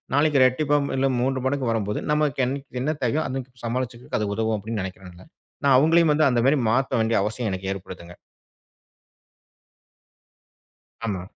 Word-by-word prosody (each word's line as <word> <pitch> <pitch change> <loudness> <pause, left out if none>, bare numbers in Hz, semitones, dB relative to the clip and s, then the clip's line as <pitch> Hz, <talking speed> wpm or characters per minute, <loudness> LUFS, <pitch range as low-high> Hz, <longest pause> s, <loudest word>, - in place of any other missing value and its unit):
நாளைக்கு 145 -2 +3
ரெட்டிப்பா 145 +3 +2
ம் - - -4
இல்ல 135 +1 +2
3 130 +1 0
மடங்கு 130 -2 0
வரும்போது 105 -2 -1
நமக்கு 150 -3 +1
என் 130 +2 -1 0.3
என்ன 155 +4 0
தேவையோ? 125 +6 +1
அன்னைக்கு 130 -2 -7
சமாளிச்சிக்கிறதுக்கு 120 0 -3
அது 105 - -1
உதவும்." 110 0 0
அப்படீன்னு 105 0 -4
நெனைக்கிறேன்ல்ல. 95 -1 -10 0.4
நான் 135 -2 +6
அவுங்களையும் 160 +3 +4
வந்து, 155 +1 +3
அந்தமாரி 125 +4 +3
மாத்த 130 +2 +1
வேண்டிய 110 +1 +2
அவசியம் 110 +1 -2
எனக்கு 95 0 -4
ஏற்படுதுங்க. 90 -2 -10 2.9
ஆமா. 95 -5 -3
125 Hz, 140 wpm, -24 LUFS, 105-140 Hz, 2.9 s, நான்